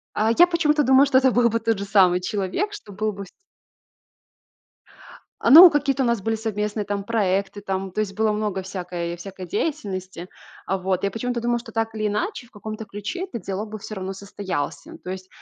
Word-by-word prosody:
А, 220 +1 +2
я 350 - +9
почему-то 305 -4 +2
думаю, 265 +1 +5
что 260 -1 +4
это 260 -1 +4
был 240 0 +3
бы 230 +1 0
тот 225 -2 0
же 200 - -3
самый 185 -3 +4
человек, 205 - -2
что 210 - -10
был 215 +2 -2
бы 200 0 -7
вс - - -16 2.1
А, - - +2
ну, 340 +4 +11
какие-то 280 -2 +1
у - - +1
нас 235 -4 0
были 225 +1 0
совместные 210 -1 -3
там 200 0 -3
проекты 200 -2 0
там, 190 -1 -3
то 215 - -3
есть 195 -2 -2
было 215 0 +1
много 210 -3 -2
всякой 175 -2 -5
всякой 185 0 -9
деятельности. 185 - -4 0.4
Э, 195 - +2
вот. 185 0 -1
Я 200 - +1
почему-то 240 +2 -3
думала, 240 0 0
что 230 -1 -11
так 225 0 -2
или 215 -1 -1
иначе 250 - -2
в - - -25
каком-то 215 0 -7
ключе 210 - -5
этот 235 - -7
диалог 200 +3 -4
бы 215 - -6
всё 215 +1 -8
равно 190 0 -4
состоялся. 200 - -5
То 180 - -6
есть, 185 0 -7
210 Hz, 205 wpm, -23 LUFS, 190-240 Hz, 2.1 s, ну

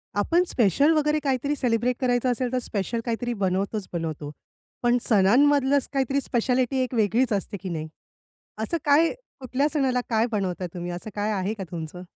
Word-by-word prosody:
आपण 335 - +2
स्पेशल 245 - +3
वगैरे 300 0 +2
काहीतरी 280 +1 0
सेलिब्रेट 245 -1 +1
करायचं 250 0 +2
असेल 245 0 -2
तर 255 - +2
स्पेशल 225 0 -2
काहीतरी 240 +1 -2
बनवतोच, 195 0 -1
बनवतो. 155 -3 -4 0.5
पण 240 0 +4
सणांमधलं 265 +7 +4
असं 275 - -2
काहीतरी 275 0 +1
स्पेशालिटी 250 +1 0
एक 255 - -5
वेगळीच 225 +2 +2
असते 205 +1 -3
की 190 - -5
नाही? 160 -2 -4 0.8
असं 335 +10 -1
काय, 300 +3 +4 0.3
कुठल्या 265 +2 0
सणाला 260 -4 +1
काय 225 0 +2
बनवता 185 -4 -2
तुम्ही 175 0 -5
असं 175 +5 -6
काय 210 +1 -1
आहे 200 +1 -1
का 200 - -6
तुमचं? 170 +1 -6
235 Hz, 170 wpm, -25 LUFS, 195-265 Hz, 0.8 s, पण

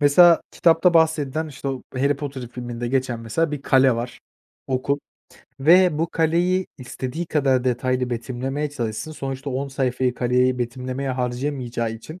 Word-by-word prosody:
mesela, 165 +4 +7
kitapta 170 +1 +3
bahsedilen, 160 -1 +2
işte, 140 -1 -6
o 130 -1 -4
Harry 140 +2 +1
Potter 135 -4 -6
filminde 120 -1 -5
geçen, 130 -2 -1
mesela, 130 +8 -1
bir 145 -2 -4
kale 130 -3 +4
var, 120 +1 -5 0.5
okul 135 +2 0 0.6
ve 170 +2 +5
bu 165 +1 0
kaleyi 175 +3 +1
istediği 130 +6 -5
kadar 135 -5 +1
detaylı 125 0 0
betimlemeye 130 +5 -3
çalışsın, 120 +3 -4
sonuçta 135 -1 -5
10 135 +2 -2
sayfayı 130 -2 0
kaleyi 125 +1 +2
betimlemeye 130 +2 -3
harcayamayacağı 125 -2 -2
için 155 +10 -10
135 Hz, 145 wpm, -23 LUFS, 125-150 Hz, 0.6 s, mesela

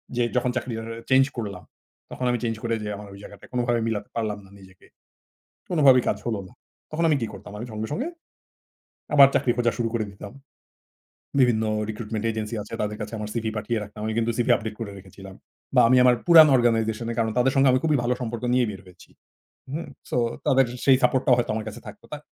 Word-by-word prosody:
যে, 120 - +2
যখন 125 0 +1
চাকরি 125 -1 -3
টা 115 - -5 0.3
চেঞ্জ 130 0 +6
করলাম, 100 -6 -5 0.5
তখন 130 - -4
আমি 120 - 0
চেঞ্জ 115 -1 -1
করে 115 0 -1
যে, - - -4
আমার 105 0 -10
ওই 100 - -12
জায়গাটায় 100 - -13
কোনোভাবে 120 -1 +1
মিলাতে 105 -2 -3
পারলাম 110 -3 -2
না - - -18
নিজেকে। 95 -1 -18 0.8
কোনো 170 -4 0
ভাবেই 130 -2 +7
কাজ 105 - +1
হল 115 - 0
না। - - -18 0.4
তখন 165 +2 -1
আমি 150 - +4
কি 115 - -1
করতাম - - -11
আমি 115 - -5
সঙ্গে, 110 +1 -4
সঙ্গে, 255 - -2 1.1
আবার 140 -2 +9
চাকরি 125 - +2
খোঁজা 120 -1 +2
শুরু 115 -1 -1
করে 115 -2 -1
দিতাম। 100 +2 -10 1.1
বিভিন্ন 120 -4 +3 0.3
রিক্রুটমেন্ট 110 0 -4
এজেন্সি 110 +1 -4
আছে 105 - -12
তাদের 105 0 -3
কাছে 105 +1 -6
আমার 105 0 -5
সিভি 115 -2 -2
পাঠিয়ে 115 +2 -2
রাখলাম। 105 +1 -10
আমি 110 - -2
কিন্তু 115 0 +1
সিভি 120 - +2
আপডেট 110 -2 -5
করে 110 -3 -5
রেখেছিলাম। 95 0 -12 0.4
বা - - +7
আমি 130 +2 +5
আমার 125 -1 +6
পুরান 165 -3 +9
অর্গানাইজেশন 115 -2 +1
এ - - -3
কারণ 110 -1 +1
তাদের 125 +2 +3
সাথে 135 0 +5
আমি 130 - +3
খুবই 155 -3 +2
ভালো 125 +1 +1
সম্পর্ক 120 -1 -4
নিয়ে 125 -1 +3
বের 100 -2 -8
হয়েছি। 90 -1 -17 0.6
হুম, 155 +3 -4 0.2
সো - - -1 0.3
তাদের 135 0 +4 0.2
সেই 135 -2 +6
সাপোর্ট 130 - +3
টাও 125 - +6
হয়তো 120 - 0
আমার 110 -1 -4
কাছে 105 - -10
থাকতো। 210 - -12
তা 150 - -4
115 Hz, 215 wpm, -24 LUFS, 105-125 Hz, 1.1 s, আবার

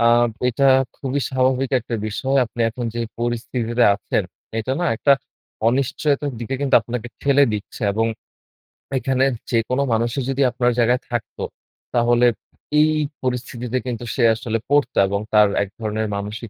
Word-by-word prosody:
আ - - +2 0.5
এটা 135 +3 0 0.3
খুবই 140 +1 -2
স্বাভাবিক 130 0 +1
একটা 120 +1 -5
বিষয়। 135 +6 -1
আপনি 120 +1 -8
এখন 120 +2 -5
যে - - -3 0.2
পরিস্থিতিতে 120 0 0
আছেন 100 - -1 0.3
এটা 130 +4 -2
না - - +1
একটা 140 +4 +4 0.6
অনিশ্চয়তার 140 +2 0
দিকে 120 +3 -3
কিন্তু 140 -1 +1
আপনাকে 120 +1 -5
ঠেলে 140 0 +5
দিচ্ছে। 105 +3 -6
এবং 110 +2 +1 0.9
এখানে 130 0 +1 0.3
যেকোনো 125 +3 +1
মানুষই 120 +4 0
যদি 135 +1 0
আপনার 125 0 +1
জায়গায় 120 +2 +3
থাকতো 120 -2 -4 0.5
তাহলে 120 0 +3 0.5
এই 155 +1 +5 0.3
পরিস্থিতিতে 125 -1 -2
কিন্তু 120 -1 -4
সে 125 - +1
আসলে 115 0 -2
পড়তো 145 0 +2
এবং 100 +1 -1
তার 105 -1 +7 0.2
এক 100 - -7
ধরনের 110 0 -2
মানসিক 105 +3 -5
120 Hz, 145 wpm, -21 LUFS, 115-135 Hz, 0.9 s, তার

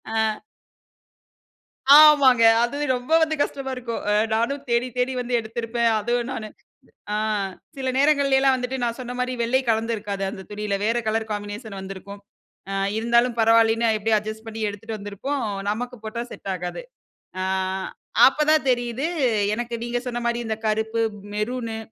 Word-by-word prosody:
அ. - - +1 1.8
ஆமாங்க 285 -6 +7 0.2
அது 240 +4 -3 0.2
ரொம்ப 250 +6 -6
வந்து 315 0 +1
கஷ்டமா 275 -2 -2
இருக்கும். 235 -2 -4
அ - - +3 0.2
நானும் 270 +5 0
தேடி 235 +1 +2
தேடி 250 +1 +1
வந்து 245 0 -3
எடுத்திருப்பேன். 230 +1 -1
அதுவும் 240 +2 -1
நானு, 215 -3 -5 0.7
அ - - 0 0.6
சில 260 -1 -1
நேரங்களைலாம் 275 -2 +4
வந்துட்டு, 255 +1 -3
நான் 235 +1 -1
சொன்ன 245 -1 -5
மாரி 250 0 -1
வெள்ளை 255 +3 +2
கலந்திருக்காது 215 -3 -1
அந்த 190 -2 -8
துணியில. 205 -1 -2
வேறு 235 +2 +1
கலர் 220 0 -1
காம்பினேஷன் 205 0 -5
வந்திருக்கும். 195 +1 -9 0.5
அ - - -2 0.2
இருந்தாலும் 235 +1 +2
பரவாயில்லன்னு, 225 0 +4
எப்படியும் 215 0 +2
அட்ஜஸ்ட் 215 +1 -7
பண்ணி 225 0 -6
எடுத்துட்டு 215 +2 -7
வந்திருப்போம், 210 +8 -4 0.3
நமக்கு 245 +3 -3
போட்டா 235 +2 -4
செட் 195 - -6
ஆகாது. 180 - -5 0.6
அ - - -1 0.9
அப்ப 285 - -5
தான் 305 -3 +2
தெரியுது, 245 +3 -1 0.5
எனக்கு 240 +1 -4
நீங்க 240 0 -1
சொன்ன 240 0 -3
மாரி, 235 0 0
இந்த 220 -1 -2
கருப்பு, 220 +1 0 0.3
மெரூனு, 225 +1 -3
235 Hz, 145 wpm, -23 LUFS, 220-250 Hz, 1.8 s, ஆமாங்க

